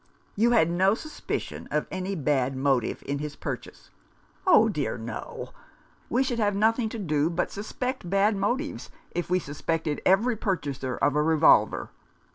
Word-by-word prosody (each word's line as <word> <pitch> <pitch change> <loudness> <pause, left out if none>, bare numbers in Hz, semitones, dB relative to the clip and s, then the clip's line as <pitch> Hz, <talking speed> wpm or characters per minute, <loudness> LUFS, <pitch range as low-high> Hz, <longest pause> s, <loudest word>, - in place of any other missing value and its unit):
"You 225 +4 +3
had 220 -9 +4
no 190 +4 +3
suspicion 310 +6 -5
of 150 +1 0
any 190 +1 -3
bad 135 -4 0
motive 135 -3 0
in 140 0 -2
his 150 0 -5
purchase? - - -7 0.3
" - - -28
"Oh 225 -12 +7
dear, 150 - -2
no. 115 0 -6 0.6
We 250 +3 +2
should 245 -3 -2
have 205 -2 +2
nothing 225 +2 +2
to 230 - -6
do 155 -6 +1
but 175 +1 -1
suspect 215 0 -4
bad 200 +3 +3
motives 245 +10 -2 0.2
if 175 0 -3
we 180 - +3
suspected 160 0 -2
every 225 +6 +3
purchaser 145 - -2
of 145 - +2
a 150 - +3
revolver. 160 0 +4
185 Hz, 160 wpm, -27 LUFS, 150-220 Hz, 0.6 s, Oh